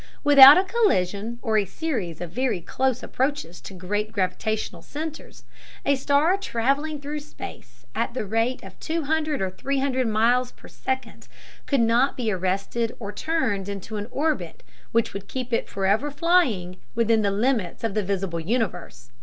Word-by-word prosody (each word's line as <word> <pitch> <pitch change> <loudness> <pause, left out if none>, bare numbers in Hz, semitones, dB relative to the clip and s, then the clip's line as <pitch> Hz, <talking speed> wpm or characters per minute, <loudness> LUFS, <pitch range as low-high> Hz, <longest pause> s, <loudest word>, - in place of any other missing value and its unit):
Without 285 0 +10
a 370 - +4
collision, 235 - 0
or 220 -3 +2
a 205 - 0
series 195 - -4
of 175 -2 -5
very 250 -1 0
close 260 +8 -1
approaches 260 - -2
to 195 - -10
great 205 +4 -2
gravitational 190 -1 -2
centers, 310 - -7 0.4
a 280 - +4
star 285 +7 +2
traveling 285 - -1
through 290 +2 -4
space 295 - -11
at - - -2
the 235 - -2
rate 225 +5 0
of - - -12
two 325 0 -2
hundred 305 -4 0
or 190 - -2
three 275 +8 -2
hundred 260 -2 0
miles 240 +3 +2
per - - -15
second 265 0 -5 0.4
could 275 -4 +2
not 235 +4 +3
be 230 -4 0
arrested 195 +5 -1
or 205 -3 -5
turned 215 - -1
into 200 +2 -6
an 205 +1 -4
orbit 270 - -2 0.3
which 230 0 +1
would 200 0 -7
keep 250 0 -5
it 230 - 0
forever 200 +8 +1
flying 280 - +1 0.2
within 230 -1 +3
the 205 - +2
limits 210 -2 0
of 225 -3 -1
the 215 - +1
visible 190 -3 -2
universe. 175 - -3
230 Hz, 165 wpm, -24 LUFS, 195-280 Hz, 0.4 s, Without